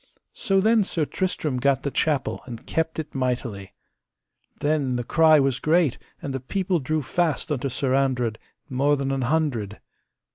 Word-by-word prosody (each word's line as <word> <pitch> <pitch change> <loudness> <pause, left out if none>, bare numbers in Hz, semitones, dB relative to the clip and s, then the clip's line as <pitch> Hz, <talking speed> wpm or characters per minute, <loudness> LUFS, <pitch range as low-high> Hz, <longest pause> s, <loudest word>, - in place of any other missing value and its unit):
So 195 -1 +1
then 220 +2 +4
Sir 165 -5 -1
Tristram 155 -6 -2
gat 135 +1 +1
the 140 - -2
chapel 150 -3 0
and 120 0 -8
kept 160 0 -1
it 160 -1 -5
mightily. 120 -6 -2 0.9
Then 145 -4 0
the 120 - -1
cry 160 +3 +5
was 135 -2 +1
great, 160 -4 +2 0.2
and 140 - -3
the 135 - -2
people 180 +7 -1
drew 155 +2 -1
fast 160 +1 -1
unto 140 -1 -1
Sir 130 +1 -1
Andred, 125 -5 +1 0.3
mo 140 +3 +2
than 135 -1 -2
an 135 -1 -1
hundred. 125 -7 -1
140 Hz, 160 wpm, -24 LUFS, 130-160 Hz, 0.9 s, cry